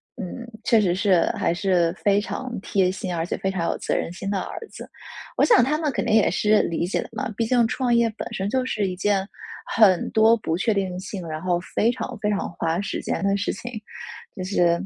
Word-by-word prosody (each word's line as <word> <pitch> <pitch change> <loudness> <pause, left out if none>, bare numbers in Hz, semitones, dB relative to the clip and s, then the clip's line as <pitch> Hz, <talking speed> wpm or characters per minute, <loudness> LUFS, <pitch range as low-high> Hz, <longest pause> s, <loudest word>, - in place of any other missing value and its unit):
嗯， 235 +6 -6 0.2
确 230 -2 +4
实 185 -5 +2
是 185 -1 +3
还 - - +1
是 175 -3 +2
非 200 0 +2
常 255 +3 -5
贴 190 -2 +1
心、 190 -1 -4
而 165 -1 -1
且 - - -2
非 190 - -1
常 185 -3 -2
有 - - -3
责 - - -1
任 - - -2
心 195 +2 -5
的 200 -1 0
儿 - - -6
子。 - - -9 0.5
我 - - +4
想 450 - +6
他 275 +5 +1
们 305 -3 0
肯 - - -2
定 230 - +1
也 220 - +5
是 210 0 +3
理 170 0 -1
解 180 - -1
的 - - -9
嘛， - - -3
毕 230 - 0
竟 240 -1 +3
创 245 +1 0
业 235 0 +4
本 - - -6
身 190 - -2
就 260 +3 +1
是 210 -6 -1
一 185 - -3
件 195 +1 0 0.5
很 195 -6 +5
多 225 +1 +5
不 165 -6 -2
确 210 +6 +1
定 190 -3 -2
性， 190 -2 -6
然 155 0 -5
后 180 -1 +1 0.2
非 230 - +3
常 245 - -5
非 210 - +1
常 205 -1 -1
花 165 +1 -1
时 200 - -3
间 - - -2
的 195 0 +2
事 200 0 -1
情。 240 +5 -7 0.7
就 185 - -3
是， 175 -3 +2
195 Hz, 255 characters per minute, -24 LUFS, 180-225 Hz, 0.7 s, 想